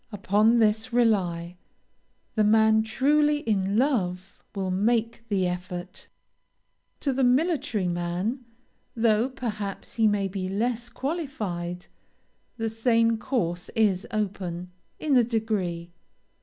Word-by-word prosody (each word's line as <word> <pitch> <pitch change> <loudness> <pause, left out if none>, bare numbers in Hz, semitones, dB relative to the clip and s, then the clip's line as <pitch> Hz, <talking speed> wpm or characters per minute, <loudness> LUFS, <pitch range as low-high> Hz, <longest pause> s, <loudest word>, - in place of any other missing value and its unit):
Upon 210 +3 +3
this 220 +2 +2
rely, 180 -8 +1 0.8
the 215 - +2
man 220 +1 +5
truly 295 +6 +2
in 200 -3 0
love 190 -9 -1
will 190 -2 -2
make 230 +4 +1
the 195 -3 +1
effort. 180 +1 -5 0.9
To 275 - +1
the 265 +1 +1
military 250 - +1
man, 175 +8 -2 0.5
though 225 +1 +2
perhaps 215 -8 -5
he 225 -1 +4
may 205 -2 +1
be 190 -1 -4
less 235 +4 -1
qualified, 215 - -4 0.7
the 225 -1 -1
same 230 0 +2
course 180 -9 -2
is 205 -4 +2
open, 185 -4 -3 0.3
in 295 -3 +1
a 245 - +6
degree. 205 -7 -2
215 Hz, 115 wpm, -26 LUFS, 185-240 Hz, 0.9 s, a